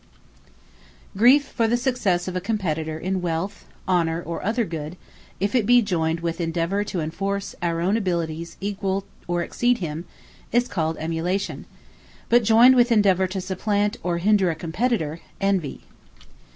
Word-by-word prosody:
Emulation 250 +8 +6
Envy - - -17
Griefe, - - -19
for 230 - +1
the 235 +2 +2
success 240 -9 0
of 185 - -4
a 185 - -1
Competitor 160 -7 -2
in 185 +3 -2
wealth, 175 +4 -3 0.2
honour, 170 -3 +1
or 170 0 -5
other 225 +3 0
good, 165 -1 -6 0.4
if 200 +1 0
it 235 -5 +2
be 245 0 +7
joyned 165 -6 0
with 170 +1 -2
Endeavour 170 +4 0
to 190 -4 -3
enforce 195 +5 -3
our 170 -1 -1
own 190 +5 +2
abilities 170 -5 -2
to 195 - -8
equal 195 -1 -1 0.2
or 175 0 0
exceed 245 +6 +1
him, 165 -3 -5 0.5
is 240 +2 +2
called 160 -6 -2
EMULATION: 165 +5 -2 0.6
but 240 0 +5
joyned 230 +4 +7
with 245 -1 +4
Endeavour 195 -4 +4
to 190 +1 -4
supplant 205 +4 -1
or 175 -1 -1
hinder 195 +1 +3
a 165 - -1
Competitor, 165 -1 -1 0.2
ENVIE. 195 -7 -1
185 Hz, 165 wpm, -23 LUFS, 165-210 Hz, 0.6 s, be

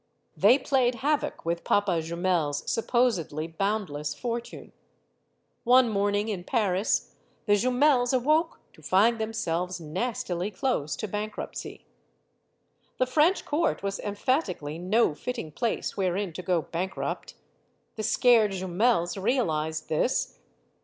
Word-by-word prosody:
They 220 +7 +6
played 255 -3 +1
havoc 295 - 0
with 170 +1 -1
Papa 195 -5 +2
Jumel's 170 -3 -1
supposedly 225 - 0
boundless 165 -4 -2
fortune. 235 - -5 0.9
One 250 0 +5
morning 205 0 0
in 190 -5 -3
Paris, 205 -3 0 0.3
the 205 - +3
Jumels 250 +3 +3
awoke 305 +6 +1
to - - -18
find 205 +9 +3
themselves 180 -5 -2
nastily 180 +2 -3
close 210 - -1
to 215 - -4
bankruptcy. 210 +2 -6 1.1
The 255 - +2
French 305 +8 +2
court 310 - 0
was 200 0 -2
emphatically 200 - -2
no 185 0 +2
fitting 230 - -5
place 230 +8 -2
wherein 190 -1 -1
to 185 - -6
go 175 -2 0
bankrupt. 185 +3 -4 0.6
The 220 - -4
scared 220 -2 +4
Jumels 190 0 0
realized 160 - 0
this. 105 - 0
205 Hz, 115 wpm, -27 LUFS, 170-245 Hz, 1.1 s, They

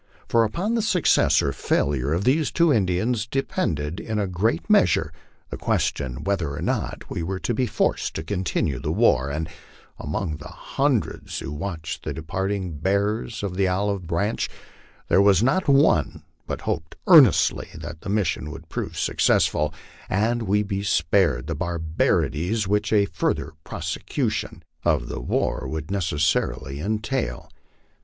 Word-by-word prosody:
For 115 -1 +4
upon 175 - -1
the 235 - +2
success 190 -6 +3
or 70 - 0
failure 70 0 0
of 85 +4 0
these 145 +5 +2
two 170 -3 +3
Indians 105 +2 +1
depended 90 - -2
in 110 -1 -3
a 105 - +1
great 90 0 0
measure - - +3 0.4
the - - -4
question 65 -1 -1
whether 85 -8 -1
or - - -5
not - - -2
we - - -4
were 95 +3 -2
to 120 - -1
be 125 +2 0
forced - - 0
to 80 - -3
continue 90 -7 -1
the 75 +3 -2
war; 80 - +3
and 80 +3 -3 0.5
among 75 +1 -3
the 75 - -10
hundreds - - -2
who 70 - -5
watched 80 +1 -5
the - - -3
departing 95 0 -3
bearers 100 +4 0
of 95 -3 -3
the 95 0 +2
olive 95 -1 -1
branch, 100 +6 -1 0.6
there 95 - +4
was 100 0 +5
not 155 +9 +2
one 140 0 +3 0.2
but - - -4
hoped 80 +1 -3
earnestly 150 - +6
that 80 -1 -8
the 100 - -6
mission 90 -7 0
would 80 +2 -10
prove - - -4
success - - +3
ful, 75 0 0 0.4
and 115 +5 +1
we 105 -1 +1
be 100 -1 -3
spared 80 -7 +2
the 80 - -3
barbarities 85 +4 0
which 105 +1 0
a 105 -2 +4
further 80 -4 -2
prosecution - - -3 0.2
of - - +1
the - - -4
war - - -1
would 80 +1 -5
necessarily 75 -7 0
entail. 110 - -2
95 Hz, 155 wpm, -24 LUFS, 80-110 Hz, 0.6 s, earnestly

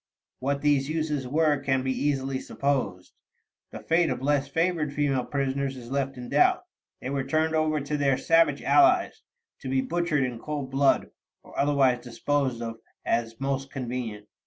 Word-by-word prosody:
What 140 +2 -2
these 145 -1 +2
uses 155 -4 -2
were 150 +1 +2
can 135 -1 0
be 130 - 0
easily 135 -1 -1
supposed. 130 -13 -2 0.6
The - - -9
fate 165 0 +2
of - - -2
less 140 +1 +1
favored 165 0 0
female 140 -3 +1
prisoners 135 -1 -2
is 120 0 -10
left 135 -1 -1
in 125 -1 -7
doubt; - - +3 0.4
they 130 - -4
were 140 -1 -1
turned 155 +4 0
over 155 -1 +1
to 150 +2 -2
their 140 -2 +2
savage 165 0 +3
allies, 355 0 +4 0.4
to 135 - -6
be 130 0 +2
butchered 170 -2 0
in 125 -2 -3
cold 145 -1 -5
blood, 135 +1 +2 0.3
or - - -16
otherwise 135 -4 +2
disposed 130 0 -1
of 115 -1 -6 0.3
as 115 -1 -1
most 135 0 -2
convenient. 120 -5 -5
140 Hz, 165 wpm, -26 LUFS, 130-150 Hz, 0.6 s, allies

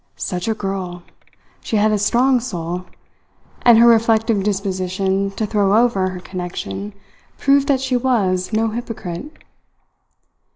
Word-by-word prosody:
Such 180 -2 -4
a 220 - 0
girl! 190 -4 -5 0.6
She - - -3
had 215 +1 +3
a 210 - +1
strong 245 +5 +3
soul; 180 -6 -5 0.8
and 240 -2 +6
her 230 - +7
reflective 225 -2 +3
disposition 190 -1 -1
to 220 - 0
throw 205 -1 +2
over 225 -6 +2
her 185 -1 -7
connection 185 +3 -6 0.4
proved 280 0 +3
that 270 -2 +2
she 265 -1 -1
was 210 -8 0
no 225 +1 +1
hypocrite. 230 - -6
210 Hz, 130 wpm, -19 LUFS, 185-235 Hz, 0.8 s, her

